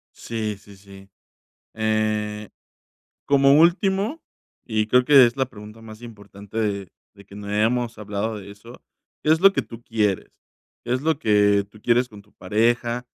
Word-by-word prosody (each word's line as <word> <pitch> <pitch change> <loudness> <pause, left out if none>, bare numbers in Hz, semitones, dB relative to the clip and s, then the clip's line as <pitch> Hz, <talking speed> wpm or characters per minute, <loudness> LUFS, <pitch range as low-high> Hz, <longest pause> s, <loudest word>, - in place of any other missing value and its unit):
Sí, 110 -3 -4
sí, 100 0 -17
sí, 95 0 -16 0.7
eh, 110 -1 -1 0.8
como 140 +1 +5
último, 195 - +1 0.4
y 110 -2 -1
creo 125 +2 +4
que 140 -2 +7
es 120 - -1
la 135 -1 0
pregunta 105 +1 -13
más 110 0 -12
importante 105 -2 -11
de 100 -3 -2 0.3
de 100 - -17
que 100 - -15
no 100 0 -8
hemos 115 +3 0
hablado 105 +1 -4
de 100 0 -12
eso, 115 +5 -14 0.4
¿qué 155 - +3
es 160 - -1
lo 195 +1 +7
que 135 - -1
tú 115 +1 -12
quieres?, 105 -4 -1 0.6
¿qué 120 - -1
es 130 - -1
lo 160 -1 0
que 105 -4 +3
tú 105 0 -18
quieres 120 +1 +2
con 105 -4 -14
tu 105 - -29
pareja?, 120 +4 0
110 Hz, 170 wpm, -22 LUFS, 105-125 Hz, 0.8 s, que